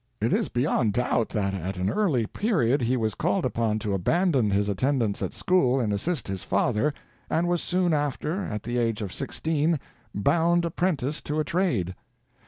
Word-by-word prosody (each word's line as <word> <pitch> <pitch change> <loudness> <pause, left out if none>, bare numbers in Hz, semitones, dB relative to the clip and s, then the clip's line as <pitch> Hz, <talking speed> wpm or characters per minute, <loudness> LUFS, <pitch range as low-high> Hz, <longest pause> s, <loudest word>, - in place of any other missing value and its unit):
It - - +1
is - - +1
beyond 120 -4 +1
doubt 120 -1 +1
that 100 -3 -1
at 95 +1 -4
an 90 +1 0
early 165 - +1
period 145 - +1
he 125 +2 +1
was 110 -3 0
called - - 0
upon 110 -2 0
to 105 -2 -2
abandon 135 - +2
his 100 +1 +1
attendance 115 +1 0
at - - -2
school 135 -8 +2
and 110 -4 0
assist 145 - -1
his 95 -2 -4
father, 145 +8 +1 0.4
and 170 +2 +1
was 175 -1 +1
soon 180 -2 +1
after, 150 +5 -1
at 105 - -4
the 120 +1 -1
age 115 -2 0
of 95 - -5
sixteen, 155 +2 0 0.4
bound 170 +9 +2
apprentice 160 -4 -1
to 150 +1 -2
a - - +2
trade. 150 - 0
130 Hz, 180 wpm, -26 LUFS, 105-165 Hz, 0.4 s, abandon